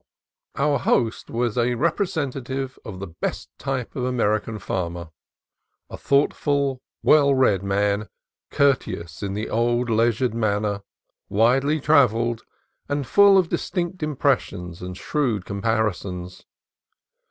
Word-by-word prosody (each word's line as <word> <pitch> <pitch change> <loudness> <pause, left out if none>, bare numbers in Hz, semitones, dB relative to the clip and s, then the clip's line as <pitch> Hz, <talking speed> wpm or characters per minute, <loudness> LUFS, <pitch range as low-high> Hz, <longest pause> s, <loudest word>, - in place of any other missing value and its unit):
Our 140 0 +1
host 115 -1 0
was 120 0 -1
a 120 +1 +1
representative 135 - -2
of 100 -4 -8
the 95 - -5
best 85 -3 -5
type 135 -3 -3
of 125 - -2
American 110 -3 0
farmer: 85 -4 -4 0.8
a - - -5
thoughtful, 140 -1 +1 0.2
well 140 -2 +5
read 115 -8 +3
man, 100 +1 0 0.4
courteous 130 - 0
in 100 -1 -3
the 105 +1 -3
old, 120 +1 +1
leisured 115 +2 +2
manner, 105 -2 0 0.5
widely 135 +8 +3
trav 140 -5 +5
elled, 115 0 -1 0.5
and 145 -1 -1
full 200 +8 +6
of 180 -3 +2
distinct 180 -1 -3
impressions 90 - -1
and 90 0 -6
shrewd 120 -10 -1
comparisons. 100 -4 -2
120 Hz, 120 wpm, -23 LUFS, 100-140 Hz, 0.8 s, full